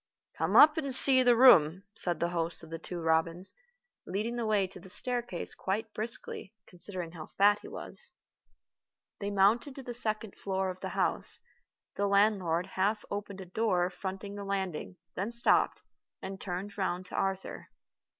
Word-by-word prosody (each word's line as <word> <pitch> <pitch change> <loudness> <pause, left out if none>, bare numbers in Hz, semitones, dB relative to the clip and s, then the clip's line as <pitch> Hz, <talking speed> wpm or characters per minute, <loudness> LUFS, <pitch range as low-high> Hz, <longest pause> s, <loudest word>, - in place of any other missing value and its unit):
"Come - - -1
up 305 +1 +8
and 275 -5 0
see 265 -1 +8
the 245 -1 +5
room," 185 - +6
said 175 -1 +3
the 170 - 0
host 170 -1 -2
of 160 - -13
The 165 - -5
Two 175 +1 -6
Robins, 165 +3 0 0.5
leading 220 +5 -3
the 235 -2 -2
way 210 -3 +2
to 185 0 -10
the 185 - -14
staircase 240 -2 -2
quite 215 +3 -4
briskly, 220 -2 -5
considering 180 -1 -8
how 165 -2 -9
fat 205 +1 +5
he - - -11
was. 480 - -10 1.1
They 200 -1 -3
mounted 210 +7 +2
to 270 - -9
the 245 - -6
second 215 -3 -2
floor 190 -1 -2
of 180 - -11
the - - -5
house. - - +2 0.6
The 200 - +1
landlord 200 -4 +2
half 200 +3 -1
opened 200 -1 -5
a - - -8
door 180 -2 0
fronting 195 +2 -6
the 205 0 -7
landing, 190 -3 -4 0.2
then 200 +5 -3
stopped, 235 0 +1 0.4
and 195 0 -7
turned 195 +2 -5
round 185 -1 -2
to - - -9
Arthur. 195 -1 -3
195 Hz, 170 wpm, -30 LUFS, 180-220 Hz, 1.1 s, up